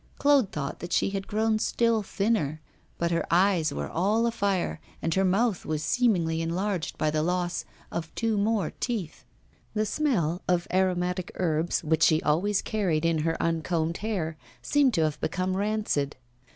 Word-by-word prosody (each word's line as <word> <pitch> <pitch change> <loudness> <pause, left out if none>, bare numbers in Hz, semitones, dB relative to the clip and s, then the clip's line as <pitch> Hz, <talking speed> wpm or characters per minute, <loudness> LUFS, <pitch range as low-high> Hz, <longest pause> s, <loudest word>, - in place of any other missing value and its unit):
Claude 280 -7 +4
thought 140 -1 -4
that 175 - -7
she - - +2
had 195 -1 -4
grown 220 +1 +1
still 230 0 +2
thinner, 195 -7 0 0.4
but 170 0 0
her 170 - +1
eyes 175 -3 +3
were - - -3
all 210 +7 +1
afire, 200 -8 0 0.2
and 165 - -1
her 190 - +2
mouth 195 +1 +1
was 155 0 -2
seemingly 175 -10 +2
enlarged 175 +1 -2
by 155 - +1
the 155 0 +1
loss 175 +1 -1 0.3
of 165 -1 -4
two 225 -2 0
more 205 -4 +1
teeth. 215 -10 -3 0.5
The 215 0 +1
smell 200 - 0
of 175 -1 +1
aromatic 180 -1 0
herbs 165 -2 0
which 160 0 +1
she 160 -1 +5
always 190 +7 +1
carried 175 -7 0
in 165 -1 +2
her 165 +1 0
uncombed 165 0 0
hair 180 -8 -3 0.3
seemed 280 -5 +3
to 165 - +3
have 155 -1 -1
become 185 +3 -1
rancid. 200 -8 -1
180 Hz, 165 wpm, -27 LUFS, 165-210 Hz, 0.5 s, she